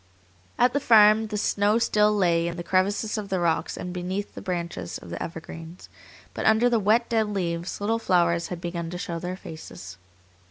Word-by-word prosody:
At 245 0 +3
the 285 - +2
farm 220 -3 +6
the 210 -1 -4
snow 205 +1 +2
still 210 -2 +3
lay 170 -5 +2
in 170 +1 -4
the 175 - -5
crevices 200 +4 0
of 200 -2 -7
the 190 - 0
rocks 170 -2 0
and 180 - -5
beneath 185 +3 -4
the - - -8
branches 170 - -4
of 85 - -12
the - - -5
evergreens, 165 +1 -8 0.4
but - - -2
under 220 +3 +4
the 230 - +3
wet, 220 +4 +3
dead 225 -2 +1
leaves 175 -3 -3
little 225 +3 0
flowers 170 -4 +2
had 180 - -6
begun 170 -1 -4
to 180 - -5
show 170 -1 -4
their 180 +2 -5
faces. 155 - -10
185 Hz, 195 wpm, -25 LUFS, 170-210 Hz, 0.4 s, farm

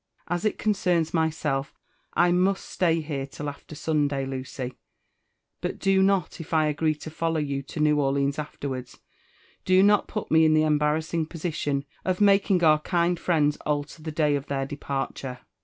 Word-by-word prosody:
As 175 +3 -2
it 215 - +1
coneems 180 -6 +1
linyself, 155 -4 -1 0.4
I 175 0 +4
must 185 +2 +2
stay 165 -2 +1
here 140 -3 -4
tiH 145 +1 -7
after 145 +2 -8
Sunday, 145 -3 0
Lucy; 130 -1 -5 0.9
but - - -3
do 195 -1 +3
not, 190 -3 +1
if 165 +1 -4
I 155 -1 +4
agree 155 +1 +1
to 155 +1 -9
follow 165 0 -1
you 140 -2 -2
to 140 +3 -8
New 150 -1 +3
Orleans 140 +1 0
afterwards 135 -4 -5 0.7
nlo 185 +1 +6
not 205 0 +4
put 215 - -5
me 160 0 +6
ia 160 - +5
the 155 0 +4
embarr 150 0 +2
assitig 160 0 -2
posi^ 165 0 -4
tion 140 -2 -1 0.2
of 185 -1 -1
making 195 -3 +4
oar 155 -1 +6
kind 170 +1 0
friends 150 -4 +2
alter 150 +1 -3
the 155 0 -5
day 150 -1 +2
of 140 -1 -4
their 135 -1 -1
departure. 135 -2 -4
155 Hz, 175 wpm, -26 LUFS, 145-175 Hz, 0.9 s, nlo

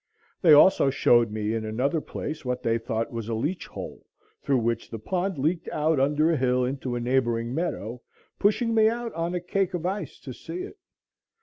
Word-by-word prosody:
They 165 -5 +7
also 145 -1 +6
showed 120 -3 +4
me 105 0 -2
in 115 -1 -2
another 130 +9 -1
place 155 +1 -6
what 125 -1 -3
they 115 0 +1
thought 115 0 -3
was 115 -1 -5
a 115 - -1
"leach 145 +11 -2
hole," - - -8 0.4
through 135 - +1
which 115 -1 -1
the 115 - -5
pond 180 - -2
leaked 160 +5 -1
out 155 -1 +1
under 150 +4 +3
a 165 - +1
hill 125 -1 +2
into 130 -1 -3
a - - -1
neighboring 120 -1 0
meadow, 125 - -3 0.4
pushing 230 +3 +2
me 220 -1 +5
out 235 0 -4
on 170 +2 -2
a - - 0
cake 185 +1 -1
of 175 -1 -4
ice 195 +3 -3
to 130 - -7
see 165 +8 -7
it. 405 - -10
140 Hz, 200 wpm, -26 LUFS, 120-175 Hz, 0.4 s, They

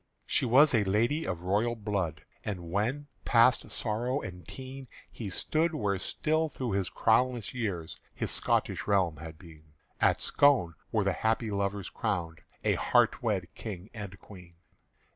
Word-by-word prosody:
She - - +1
was 140 +5 +6
a 110 -3 +4
lady 115 +11 +1
of 90 -2 -3
royal 105 +6 +1
blood; 95 -8 -2 0.2
And 90 -5 -5
when, 120 +10 0 0.2
past 120 +1 +4
sorrow 120 +5 -1
and 90 - -8
teen 130 0 -8 0.2
He 110 -4 -6
stood 160 - 0
where 100 -7 0
still 155 - 0
through 130 -4 -4
his 95 -2 0
crownless 120 -1 +2
years 100 -10 -3 0.2
His - - -2
Scotish - - 0
realm 95 -6 +2
had 80 0 -9
been, 80 -3 -16 0.3
At - - +4
Scone 135 -12 +3 0.2
were 110 -3 +2
the 100 -1 +1
happy 110 +1 0
lovers 100 -1 -2
crowned, 80 -2 -2 0.2
A - - +3
heart - - +3
wed - - -1
King 100 -2 -7
and 100 -4 -7
Queen. 90 -4 -14
105 Hz, 155 wpm, -30 LUFS, 90-125 Hz, 0.3 s, was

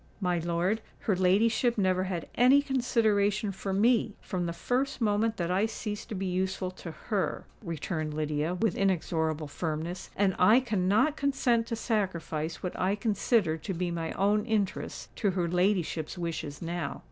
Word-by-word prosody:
"My 180 -3 +1
lord, 175 +6 0 0.2
her 205 - +1
ladyship 220 +6 +3
never 185 -2 +2
had 180 -3 -3
any 260 +4 +5
consideration 215 -6 +1
for 195 +1 -5
me, 220 +2 +2
from 180 -2 -3
the - - -2
first 250 +11 -1
moment 220 0 +1
that 175 0 -1
I 195 +4 +2
ceased 210 -1 -5
to 220 - -4
be 195 0 -3
useful 185 0 -1
to 185 -2 -9
her," 195 +4 -2 0.2
returned 155 -2 -3
Lydia, 155 +2 -1
with 215 0 +1
inexorable 160 -5 0
firmness; 160 +4 -4
"and 195 -2 +2
I 215 +7 +7
cannot 220 +5 +1
consent 245 -5 +1
to 230 - -2
sacrifice 170 -8 -2
what 180 - -2
I 190 +2 +2
consider 210 -5 +1
to 190 +5 -5
be 175 0 -1
my 165 -1 -3
own 205 +2 +2
interests 210 -4 -2
to 205 - +1
her 175 -1 +1
ladyship's 180 -2 0
wishes 165 -3 -4
now." 170 -3 -3
190 Hz, 160 wpm, -29 LUFS, 170-220 Hz, 0.2 s, I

